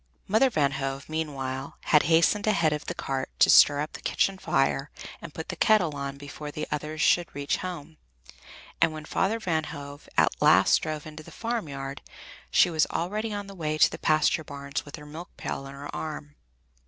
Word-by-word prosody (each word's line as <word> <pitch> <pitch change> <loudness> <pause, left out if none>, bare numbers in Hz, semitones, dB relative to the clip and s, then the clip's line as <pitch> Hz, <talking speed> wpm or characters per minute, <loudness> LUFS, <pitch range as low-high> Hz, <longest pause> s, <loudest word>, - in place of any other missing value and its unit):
Mother 220 +6 +4
Van 145 - +1
Hove, 135 0 -4
meanwhile, 140 -4 -4
had 150 - +5
hastened 170 +6 +3
ahead 170 -7 +3
of 150 - -4
the - - -3
cart 135 -1 -3
to - - +6
stir 145 0 +7
up 150 - -4
the - - -9
kitchen 195 -1 0
fire 140 -4 +1 0.3
and 170 - -8
put 160 +2 -7
the - - -3
kettle 180 -9 +3
on 140 0 -5
before 145 +1 -8
the 150 +1 -5
others 150 +1 -3
should 175 +1 +4
reach 140 0 -1
home, 165 -4 -7 0.8
and 155 - +4
when 155 -1 -7
Father 200 +7 0
Van 165 -7 -1
Hove 145 0 -9
at - - +3
last - - +6
drove 155 -1 -4
into 155 0 -9
the - - -13
farmyard, 140 -13 -4 0.5
she 175 - +4
was 160 -1 +2
already 210 +6 -2
on 205 -1 -4
the 195 - -10
way 155 -4 -2
to - - +5
the - - -7
pasture 155 0 +2
bars 140 -1 -5
with 145 - -8
her 150 -2 -11
milk 160 +4 -10
pail 135 - -4
on 135 - -9
her 145 +1 -8
arm. 150 -1 -6
155 Hz, 195 wpm, -27 LUFS, 140-170 Hz, 0.8 s, stir